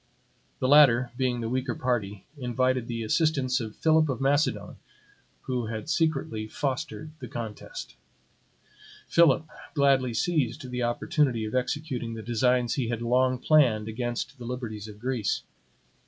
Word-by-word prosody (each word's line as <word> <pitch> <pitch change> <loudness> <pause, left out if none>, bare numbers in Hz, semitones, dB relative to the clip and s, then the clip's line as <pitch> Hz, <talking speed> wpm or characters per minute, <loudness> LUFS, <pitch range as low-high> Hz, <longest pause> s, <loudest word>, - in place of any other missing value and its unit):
The 130 - 0
latter, 130 -4 +6
being 125 -2 0
the 115 - -2
weaker 130 0 -1
party, 105 -6 -2
invited 130 -2 0
the 115 -2 -3
assistance 135 +1 +1
of 110 -3 -6
Philip 160 -1 +3
of 130 -3 -2
Macedon, 145 +3 0 0.7
who 125 -3 -2
had 110 +7 -4
secretly 135 -9 0
fostered 135 +2 -3
the 125 - -7
contest. 115 - -7 1.1
Philip 160 -2 +4 0.3
gladly 135 -4 +3
seized 130 -4 -1
the 125 0 -2
opportunity 120 0 +1
of 110 - -6
executing 130 -3 -2
the 110 - -7
designs 120 +1 +2
he 130 -5 -1
had 115 0 -3
long 130 +2 +2
planned 125 -7 +3
against 120 +3 -4
the 120 - -7
liberties 115 -4 -5
of 105 -1 -10
Greece. 120 -2 -1
125 Hz, 140 wpm, -27 LUFS, 115-135 Hz, 1.1 s, latter